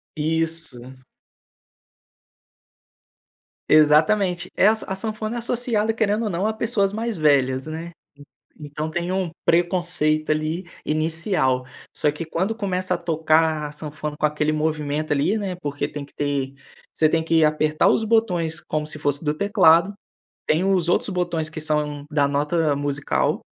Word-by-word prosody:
Isso. 160 -4 0 2.9
Exatamente. 175 +4 +4
Essa 215 +3 +3
a 190 - 0
sanfona 215 +2 -4
é - - -2
associada 230 -2 0
querendo 220 0 0
ou 215 - -1
não 185 +3 -1
a 220 - +1
pessoas 215 -3 0
mais 225 -1 -3
velhas, 135 -2 +2
né. 165 +2 -6 0.7
Então, 150 +1 -5
tem 175 +2 -2
um 185 -2 -1
preconceito 170 -3 +1
ali, 155 +4 -1 0.2
inicial. 155 -4 0 0.3
Só 150 - +2
que 150 +3 -6
quando 185 +7 -2
começa 185 -4 -2
a - - 0
tocar 160 -2 +1
a 145 - -7
sanfona, 150 0 -6
com - - -4
aquele 150 0 +1
movimento 155 -1 -1
ali, 145 +9 +1
né 195 -4 -3
porque 145 -2 -3
tem 145 -1 -7
que - - -26
ter, 140 -2 -2 0.4
você 155 - +2
tem 160 +1 +2
que 160 -1 +3
apertar 155 0 +2
os - - +2
botões 185 -8 +1
como 155 -1 -3
se 155 - -6
fosse 145 +1 -1
do 150 -1 0
teclado. 175 0 +4 0.5
Tem 160 +4 +2
os 185 -3 +1
outros - - +1
botões 175 -4 -2
que 155 0 -7
são 150 -2 -2
da 145 -2 +2
nota 150 +1 +1
musical 145 0 -1
160 Hz, 150 wpm, -22 LUFS, 150-185 Hz, 2.9 s, Exatamente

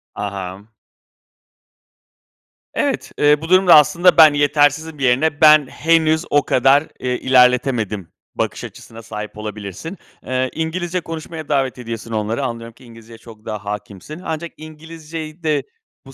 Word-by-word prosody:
Aham. 100 0 -6 2.1
Evet, - - -2
eee, 150 0 +4
bu 160 - -7
durumda 185 -1 +6
aslında 170 +4 +4
ben 155 -2 +8
yetersizim 145 +2 +1
yerine, 135 +4 +1
ben 155 -2 +7
henüz 160 +2 +1
o 145 0 +3
kadar, 135 +4 +3
eee, 125 -1 -2
ilerletemedim 125 - +2 0.2
bakış - - -3
açısına 115 0 -11
sahip 105 -2 -8
olabilirsin. 105 - -7 0.3
Eee, 130 0 -1
İngilizce 175 +2 -3
konuşmaya 160 -1 -8
davet 135 -3 0
ediyorsun 115 -2 -7
onları. 110 +4 -2
Anlıyorum 115 -2 -5
ki 125 - -20
İngilizceye 115 -1 -14
çok 110 -2 -16
daha 105 -2 -6
hâkimsin. 105 - -7
Ancak 160 +1 -4
İngilizceyi 155 +1 -10
de 150 -3 0 0.4
bu 135 - -13
140 Hz, 130 wpm, -19 LUFS, 115-160 Hz, 2.1 s, ben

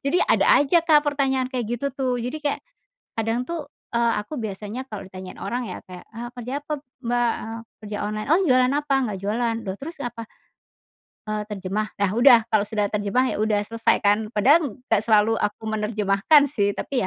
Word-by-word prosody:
Jadi 290 +6 +2
ada - - +3 0.2
aja, 290 +5 +4
Kak, 310 -3 +5
pertanyaan 270 -3 +1
kayak 250 -4 -2
gitu 240 +4 -2
tuh, 260 -2 0
jadi 250 +6 -4
kayak, 295 -2 -2 0.6
kadang 225 +2 0
tuh, 325 +1 -5 0.3
eee, 235 0 +2
aku 290 +8 -7
biasanya 215 +3 -5
kalo 210 -4 -6
ditanyain 185 0 -9
orang 240 +5 -3
ya 180 - -7
kayak, 180 -1 -10
"Ah, 240 +2 -6
kerja 250 +4 -5
apa, 300 0 -3 0.2
Mbak?" 240 0 +1
eee, 225 +1 -6 0.2
"kerja 210 0 -5
online. 215 +3 -4
Oh, 345 - +5
jualan 255 -2 +4
apa? 290 -1 0
Nggak 210 -5 -3
jualan. 225 +3 0
Loh, 190 0 -3
terus 320 +4 -8
apa?" 235 -2 -5 1.0
eee, 215 0 -2
"terjemah." 205 +1 -3
Nah, 200 -2 +1
udah. 240 +2 +7
Kalau 215 -2 +4
sudah 210 -2 0
terjemah, 210 +4 +1
ya - - -3
udah 215 -1 +2
selesai 230 +2 +1
kan? 210 +1 +3
Padahal 265 +3 +3
nggak 225 -4 0
selalu 220 0 +4
aku 210 - -2
menerjemahkan 215 +5 +3
sih 205 -7 0
tapi 270 -3 -2
230 Hz, 185 wpm, -23 LUFS, 210-265 Hz, 1.0 s, udah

